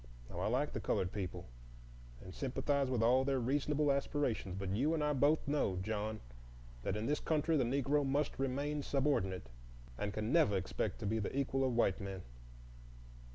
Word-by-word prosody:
Now - - -5
I - - 0
like - - 0
the - - -2
colored 90 -1 0
people, 90 -3 -4 0.8
and 90 - -9
sympathize 135 +1 0
with 120 -3 +1
all 125 +3 +5
their 135 -1 +1
reasonable 145 +3 +1
aspirations; 140 -9 -1
but 95 -1 -3
you 150 +8 +2
and 155 - 0
I 150 0 +2
both 145 +3 +3
know, 140 -10 +1
John, 110 +2 -3 0.6
that 95 - -1
in 105 - -2
this 150 +3 +1
country 160 +1 +1
the 140 - +3
Negro 140 +3 +1
must 140 +1 0
remain 140 +3 -1
subordinate, 95 - 0 0.5
and 105 0 -1
can 110 +4 -2
never 155 - +4
expect 90 -8 -2
to - - -3
be 110 +2 +1
the 110 +6 -3
equal 135 -1 +1
of 130 -2 +1
white 100 -5 +2
men. 95 -2 -5
130 Hz, 180 wpm, -35 LUFS, 105-145 Hz, 0.8 s, all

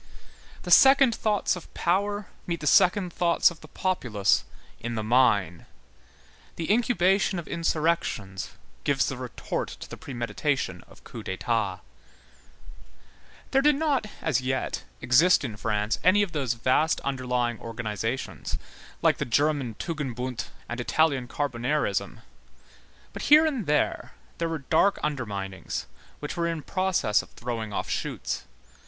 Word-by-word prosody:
The - - -5
second 270 -2 +7
thoughts 210 -3 +1
of 180 - -11
power 205 +3 0 0.2
meet 170 -1 -2
the - - -5
second 180 +5 +4
thoughts 170 0 +3
of 165 - -13
the - - -12
populace 125 - +1 0.4
in 120 0 -4
the 110 - -2
mine. 105 -8 +2 0.9
The 165 +2 -2
incubation 200 -4 +2
of 170 - -5
insurrections 160 - -1 0.3
gives 135 -2 +2
the 135 - -2
retort 125 -2 -4
to - - -8
the - - -9
premeditation 130 0 -2
of - - -18
coups - - -8
d'état. 95 0 -1 1.7
There 270 - +4
did 295 +1 +4
not, 280 -6 0 0.2
as 140 -6 +1
yet, 130 +1 -2 0.2
exist 150 +7 +5
in 115 -6 -4
France 105 +1 -1
any 205 +3 +5
of 195 - -4
those 135 -7 -1
vast 130 +7 +2
underlying 125 -4 -1
organizations, 115 +2 -4 0.5
like - - +3
the - - +1
German 140 -2 +1
tugendbund 130 -6 -4 0.2
and 120 - -5
Italian 135 0 +1
Carbonarism; 145 +2 -1 0.9
but - - -6
here 305 +2 +8
and 265 - -1
there 150 0 0 0.3
there 165 0 0
were 160 -4 -4
dark 200 +5 +4
underminings, 100 -10 -3 0.3
which 145 - -5
were 170 -1 0
in 165 -3 -3
process 185 - +1
of - - -15
throwing 115 -3 -4
off - - -3
shoots. - - -3
145 Hz, 135 wpm, -26 LUFS, 120-175 Hz, 1.7 s, here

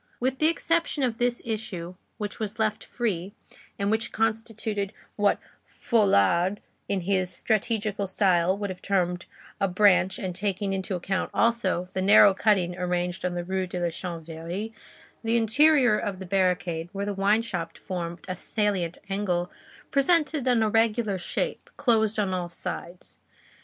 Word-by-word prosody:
With 260 +2 -1
the 310 - +5
exception 330 -3 +1
of 235 -3 0
this 245 0 0
issue 205 -6 -4 0.2
which 210 -2 -5
was 215 0 -4
left 215 -1 0
free, 200 -5 -2 0.4
and 200 +1 0
which 220 +1 0
constituted 225 -2 -2 0.2
what 205 -1 +3 0.3
Folard 190 - +2 0.3
in 195 -2 0
his 185 0 0
strategical 215 -2 -1
style 185 -1 +2
would 200 -1 -3
have 185 - -9
termed 180 -3 0 0.3
a 195 - +2
branch 185 -1 +4
and 185 -2 -4
taking 195 +1 -2
into 190 0 -2
account, 185 +1 -2
also, 215 -6 +1
the 190 - -1
narrow 200 +1 +7
cutting 190 -4 +2
arranged 180 0 -2
on 180 -1 -1
the 175 - -2
Rue 190 +1 -2
de 180 0 -4
la 175 -1 0
Chanvrerie, 170 +4 -5 0.5
the 230 +1 +2
interior 245 0 +4
of 200 -2 -3
the 190 - -7
barricade, 180 -3 0
where 200 0 -3
the 205 - -2
wine 200 +3 +2
shop 170 -7 -4
formed 175 -2 -5
a 185 - -3
salient 190 -3 -1
angle, 185 -3 -1 0.4
presented 300 -1 +2
an 240 -3 +4
irregular 220 -2 +2
square, 475 - -1 0.2
closed 220 -4 +2
on 200 -3 0
all 180 -1 -2
sides. 175 +1 -7
200 Hz, 150 wpm, -26 LUFS, 180-220 Hz, 0.5 s, narrow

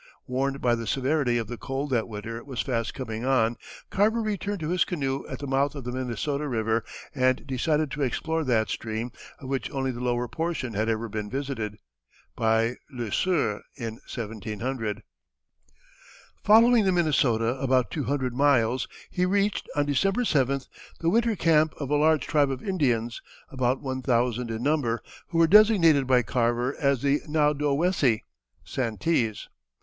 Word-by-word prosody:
Warned 135 +2 -1
by 120 - +3
the 115 -1 -3
severity 135 0 +1
of 115 - -1
the 120 +2 -7
cold 135 +1 -3
that 115 -3 +1
winter 115 +1 -6
was 130 -5 -3
fast 115 -3 -2
coming 115 -4 -5
on, 120 -3 +2 0.4
Carver 215 +4 +2
returned 205 -1 -2
to 155 - -2
his 180 0 +3
canoe 135 -6 -3
at - - -4
the 145 - -6
mouth 140 +2 +1
of 140 - -6
the 125 - -4
Minnesota 130 +4 -2
River 115 -3 0 0.3
and 130 -1 +1
decided 150 +3 0
to 150 - -4
explore 160 +5 -1
that 115 -5 +1
stream, 110 +2 -3 0.3
of 130 - -10
which 135 0 -2
only 135 -1 -2
the 120 - -7
lower 120 0 0
portion 135 -1 -3
had 110 +2 0
ever 115 +1 -1
been 105 -1 -4
visited 130 -6 -4 0.6
by 115 +2 +1
Le 120 -6 -5
Sueur 145 - +1
in 115 -4 -6
1700. 110 0 -4 1.4
Following 230 +2 +6
the 190 - +3
Minnesota 140 -10 +2
about 130 -2 +2
two 150 -5 -2
hundred 130 -3 -1
miles 130 -2 +2 0.2
he 180 - 0
reached, 200 +2 0
on 145 0 +2
December 195 - +1
7th, 140 - +1 0.3
the 165 0 +1
winter 230 +1 +2
camp 160 -3 +3
of 140 -1 -5
a - - +4
large 155 +1 +3
tribe 145 -3 +2
of 135 +7 -5
Indians, 120 - 0 0.3
about 130 0 0
one 130 -1 -3
thousand 120 -1 0
in 115 +1 -4
number, 135 -6 0 0.2
who 165 - -3
were 165 - +6
designated 170 - +6
by 125 -1 +4
Carver 120 +3 0
as 140 -4 +1
the 140 +1 +2
Naudowessie 150 -3 +2 0.4
(Santees). 115 -2 -1
130 Hz, 165 wpm, -26 LUFS, 120-150 Hz, 1.4 s, Following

